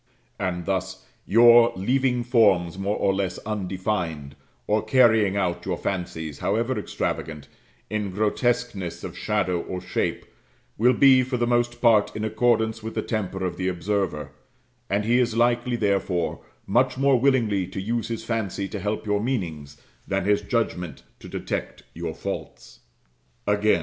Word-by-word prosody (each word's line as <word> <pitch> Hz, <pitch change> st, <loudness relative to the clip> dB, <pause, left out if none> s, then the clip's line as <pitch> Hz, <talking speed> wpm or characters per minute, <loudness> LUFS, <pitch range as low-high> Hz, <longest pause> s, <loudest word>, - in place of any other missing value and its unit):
And 90 Hz, -2 st, -2 dB
thus, 95 Hz, -1 st, -3 dB, 0.2 s
your 120 Hz, +1 st, +7 dB
leaving 125 Hz, +4 st, +1 dB
forms 100 Hz, -9 st, +3 dB
more 100 Hz, +2 st, -1 dB
or 95 Hz, -, +2 dB
less 95 Hz, -2 st, -2 dB
undefined, 95 Hz, -8 st, -3 dB, 0.3 s
or 105 Hz, 0 st, +1 dB
carrying 110 Hz, -4 st, +4 dB
out 90 Hz, -3 st, -1 dB
your -, -, -2 dB
fancies, 85 Hz, -5 st, -4 dB
however 115 Hz, +6 st, 0 dB
extravagant, 75 Hz, -7 st, -4 dB, 0.4 s
in 105 Hz, -2 st, -2 dB
grotesqueness 105 Hz, -1 st, -1 dB
of -, -, -6 dB
shadow 95 Hz, -5 st, 0 dB
or 90 Hz, -, -5 dB
shape, -, -, -2 dB, 0.5 s
will 125 Hz, +4 st, +4 dB
be 135 Hz, -1 st, +6 dB
for 125 Hz, 0 st, -2 dB
the 120 Hz, -, +1 dB
most 120 Hz, 0 st, 0 dB
part 115 Hz, -4 st, +4 dB
in 110 Hz, 0 st, -2 dB
accordance 110 Hz, 0 st, +1 dB
with 110 Hz, +1 st, -6 dB
the -, -, -1 dB
temper 95 Hz, -4 st, -3 dB
of 85 Hz, -1 st, -3 dB
the 95 Hz, -, -2 dB
observer; 95 Hz, -5 st, -2 dB, 0.6 s
and 100 Hz, +1 st, 0 dB
he 120 Hz, +2 st, +3 dB
is 120 Hz, -2 st, +1 dB
likely, 120 Hz, +1 st, +2 dB
therefore, 100 Hz, -5 st, 0 dB, 0.3 s
much 125 Hz, +6 st, +2 dB
more 135 Hz, -1 st, +3 dB
willingly 115 Hz, -8 st, +2 dB
to 95 Hz, +1 st, -6 dB
use 115 Hz, +4 st, -2 dB
his 115 Hz, -1 st, -4 dB
fancy 110 Hz, -4 st, -2 dB
to 105 Hz, -, -5 dB
help 105 Hz, +3 st, -3 dB
your 105 Hz, -1 st, 0 dB
meanings, 80 Hz, -, -3 dB, 0.3 s
than 95 Hz, -1 st, -1 dB
his 105 Hz, 0 st, +3 dB
judgment 90 Hz, -, -2 dB, 0.2 s
to -, -, -11 dB
detect -, -, -4 dB
your 80 Hz, -1 st, -5 dB
faults. -, -, -7 dB, 0.7 s
Again. 105 Hz, -2 st, +3 dB
105 Hz, 150 wpm, -24 LUFS, 95-120 Hz, 0.7 s, your